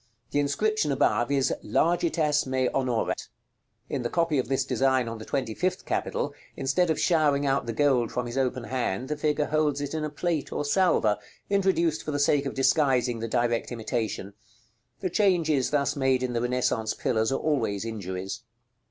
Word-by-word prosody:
The 145 - +1
inscription 150 +4 +1
above 120 -3 +2
is, 135 -2 +2
"LARGITAS 160 -4 +1
ME 130 -1 +1
ONORAT." 125 -4 -1 0.6
In 140 - -2
the 120 - -2
copy 165 -4 +1
of 125 - -1
this 135 +1 0
design 130 -2 +1
on 115 0 -5
the 110 - -8
twenty 130 -5 -2
fifth 185 - -2
capital, 145 - -2 0.2
instead 165 +7 +1
of 160 - +1
showering 150 -4 +2
out 135 -3 +1
the - - -1
gold 125 -2 +2
from 125 - -2
his 120 +1 -6
open 130 -2 0
hand, 125 -1 -2
the 150 - 0
figure 150 0 0
holds 150 -2 +1
it 145 0 -4
in 155 -1 -2
a 155 - -2
plate 160 +1 -2
or 145 - -2
salver, 145 - +2 0.3
introduced 185 -5 +2
for - - -7
the 145 - -1
sake 145 0 +2
of - - -5
disguising 130 -4 +2
the 115 - -3
direct 120 0 0
imitation. 110 -3 -3 0.7
The 185 - -1
changes 165 - +2
thus 145 0 +1
made 135 -2 +1
in 125 -1 -2
the 115 - 0
Renaissance 120 -3 0
pillars 110 0 0
are - - +1
always 115 -9 -1
injuries. 95 -1 -5
135 Hz, 180 wpm, -27 LUFS, 120-150 Hz, 0.7 s, above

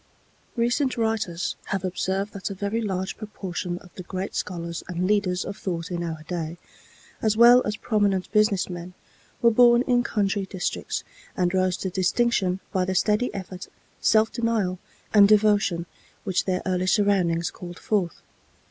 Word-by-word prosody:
Recent 245 +2 +1
writers 220 -6 -1
have 195 -2 -2
observed 190 +2 -2
that 200 0 -4
a 195 - -5
very 205 +4 -2
large 190 -3 -3
proportion 185 -4 -5
of 180 -1 -15
the - - -8
great 185 +2 -5
scholars 170 -1 -4
and 180 0 -2
leaders 190 -3 +1
of 200 - -6
thought 170 -4 -4
in 175 -1 -2
our 160 -2 -5
day, 165 0 -4 0.6
as 215 -1 +1
well 240 +2 +8
as 210 - -1
prominent 205 -4 0
business 210 -3 +3
men, 175 0 -8 0.5
were 235 - +6
born 240 +1 +6
in 245 -2 +2
country 200 -4 -1
districts, 185 -2 -3 0.3
and 180 -1 +1
rose 185 -1 +1
to 190 - -4
distinction 190 0 +1
by 185 - +2
the 185 +1 -2
steady 210 +5 +2
effort, 190 -1 -7 0.3
self 220 0 +3
denial 220 -6 -1 0.3
and 205 -2 +8
devotion 205 -5 +3 0.4
which 190 -3 0
their 185 -1 -1
early 185 0 0
surroundings 185 -4 +2
called 175 -1 -9
forth. 195 -6 -1
190 Hz, 155 wpm, -25 LUFS, 180-215 Hz, 0.6 s, well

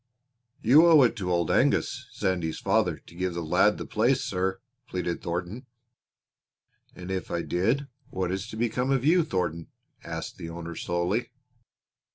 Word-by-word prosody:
"You 150 +9 +7
owe 160 -4 +7
it 120 - +2
to 90 -3 -2
Old 85 -2 +1
Angus, - - +1
Sandy's 90 -4 -1
father, - - +1
to - - -15
give 90 0 -2
the 85 - -3
lad 80 - +3
the - - -5
place, - - +2
sir," 95 +1 -1 0.3
pleaded 90 -5 -3
Thornton. 90 +9 -4 1.3
"And 90 +1 -7
if 95 -3 -3
I 85 -1 -2
did 115 +11 0 0.2
what 90 -1 -2
is 95 +3 -3
to 110 - -8
become 120 +3 0
of 135 -1 +1
you, 170 +3 +5
Thornton?" 90 - -2 0.4
asked - - -6
the 85 - -7
owner 85 0 -6
slowly. 90 +9 -1
95 Hz, 160 wpm, -27 LUFS, 85-120 Hz, 1.3 s, You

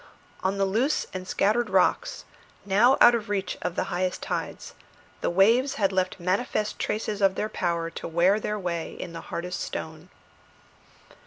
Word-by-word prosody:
On 190 +1 0
the 195 - +2
loose 230 +10 +1
and 185 -1 -6
scattered 220 +6 +1
rocks, - - +1 0.4
now 215 +7 +4
out 240 - +8
of 230 -3 -1
the - - -14
reach 195 -3 -1
of 180 -1 -3
the - - 0
highest 180 +1 -1
tides, - - -4 0.5
the - - +1
waves 230 +9 +3
had 195 -2 +1
left 185 0 -1
manifest 205 +4 -1
traces 210 -1 -2
of 195 -1 +4
their 215 - -2
power 170 -3 -2
to - - -6
wear 175 +5 +3
their 210 0 -2
way 170 -4 -3
in 175 - -7
the 165 - -6
hardest 180 +1 -5
stone. 160 +2 -6
195 Hz, 170 wpm, -26 LUFS, 180-210 Hz, 0.5 s, out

